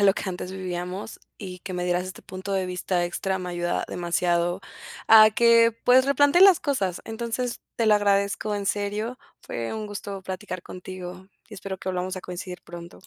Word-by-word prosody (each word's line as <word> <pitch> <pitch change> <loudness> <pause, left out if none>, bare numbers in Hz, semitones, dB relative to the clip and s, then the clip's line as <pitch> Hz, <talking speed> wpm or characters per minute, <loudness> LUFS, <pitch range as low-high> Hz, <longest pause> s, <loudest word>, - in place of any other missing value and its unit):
ah, - - +2
lo 195 -1 +6
que - - -4
antes 185 0 -4
vivíamos 185 +2 -5 0.2
y 185 -3 -8
que 185 +1 -7
me 180 0 -2
dieras 180 0 0
este 185 - -9
punto 190 +1 -5
de 190 - +1
vista 180 -1 -1
extra, 190 +2 -2
me 180 -1 -5
ayuda 175 0 -1
demasiado 175 +1 0 0.4
a 220 -1 +9
que, 230 0 +5
pues 255 +2 +6
replantee 285 +4 +4
las 385 -2 +8
cosas. 195 - -1
Entonces, 235 +2 -3 0.2
te 230 - +1
lo 215 -1 +6
agradezco 200 +1 +1
en 205 - -3
serio, 210 +5 -2 0.2
fue 115 - -4
un 215 -1 -4
gusto 200 -1 -6
platicar 185 -1 -6
contigo, 185 0 -8 0.2
espero 195 -2 -6
que 185 - -4
volvamos 185 +1 -3
a 185 - -6
coincidir 180 0 -7
pronto. 175 +2 -11
190 Hz, 185 wpm, -25 LUFS, 180-215 Hz, 0.4 s, a